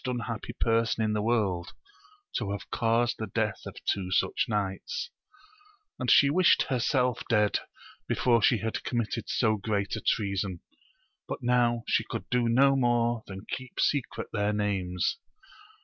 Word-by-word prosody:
181 125 -2 -3
unhappy 115 - -6
person 115 0 +2
in 110 -1 0
the 105 - 0
world 105 -6 0 0.6
to 105 - -1
have 100 0 -5
caused 115 +1 +1
the 110 - -3
death 105 +1 -1
of - - -8
two 95 -2 -1
such 90 - +1
knights; 105 - -3 0.9
and 130 -2 -1
she 140 - +7
wished 175 +5 +4
herself 125 -1 0
dead 105 -3 +3 0.5
before 120 -3 +2
she 115 - +4
had 110 +1 -3
committed 115 -1 -2
so 110 -3 +2
great 100 0 -1
a 110 - -5
treason, 100 -4 -1 0.7
but - - -5
now 120 -1 +2
she - - +2
could - - -6
do 125 -1 +2
no 135 +4 +5
more 120 -2 +2
than 95 +1 -8
keep 130 -1 -6
secret 140 -4 0
their 105 -1 +1
names. 100 - -1
115 Hz, 150 wpm, -28 LUFS, 105-120 Hz, 0.9 s, she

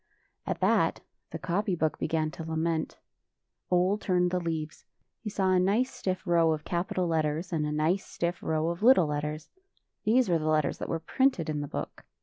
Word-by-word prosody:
At - - -2
that - - +2 0.3
the - - -5
copy 190 +2 -1
book 160 -2 -1
began 155 -1 0
to 165 - -7
lament. 160 0 -2 0.7
Ole 185 +3 +2
turned 180 -3 +1
the 180 - +1
leaves. 160 -2 -4 0.4
He 220 - -5
saw 195 -2 +1
a 185 - +4
nice 210 +8 +1
stiff 185 0 -3
row 170 -2 +3
of 155 -1 -5
capital 185 +1 -1
letters, 160 +1 -1
and 155 -2 0
a - - -2
nice 160 +6 +1
stiff 170 +1 -3
row 160 +1 0
of 170 +2 -4
little 230 -6 +6
letters. 150 +1 -4 0.5
These 235 +3 +3
were 170 -2 +2
the 155 - -3
letters 155 -2 +1
that - - -5
were 165 - 0
printed 170 - +1
in 150 -1 -2
the 145 - -4
book. - - -6
170 Hz, 190 wpm, -28 LUFS, 155-185 Hz, 0.7 s, little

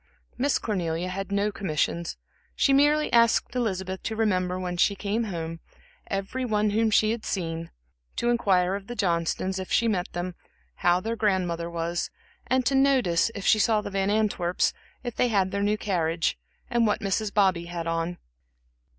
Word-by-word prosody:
Miss 275 +3 +1
Cornelia 175 -4 -2
had 195 +2 -5
no 200 +1 +1
commissions, 170 -2 -2 0.5
and 275 - +4
merely 295 +2 +3
asked 235 0 +4
Elizabeth 190 -6 -2
to 220 - -3
remember, 185 -4 0
when 180 -1 -3
she 200 +3 +3
came 210 +3 -1
home, 165 -4 -5 0.5
every 195 +7 -3
one 210 -3 +1
whom 220 +1 +2
she 215 +1 +3
had 230 -1 -3
seen, 165 -3 -3 0.5
to 240 - +1
inquire 190 -6 +2
of 200 0 -5
the 240 - -6
Johnstons, 185 0 0
if 185 - -6
she 235 - +3
met 190 -5 -1
them, 175 +1 -3 0.4
how 175 +1 +3
their 225 +3 -2
grandmother 180 -6 0
was, 170 0 -2 0.4
and 255 0 +2
to 275 - +2
notice, 265 -11 +3
if 200 - -5
she 215 - +5
saw 215 0 +3
the 205 - -6
Van 195 0 0
Antwerps, 205 -4 +1 0.3
if 240 -2 -5
they 250 - +2
had 195 -5 +1
their 200 - -1
new 205 +1 +1
carriage, 170 -5 0 0.3
and 235 -1 +2
what 210 - 0
Mrs. 200 +1 -1
Bobby 190 -5 +2
had 170 -1 -5
on. 165 +1 -2
195 Hz, 175 wpm, -26 LUFS, 175-220 Hz, 0.5 s, she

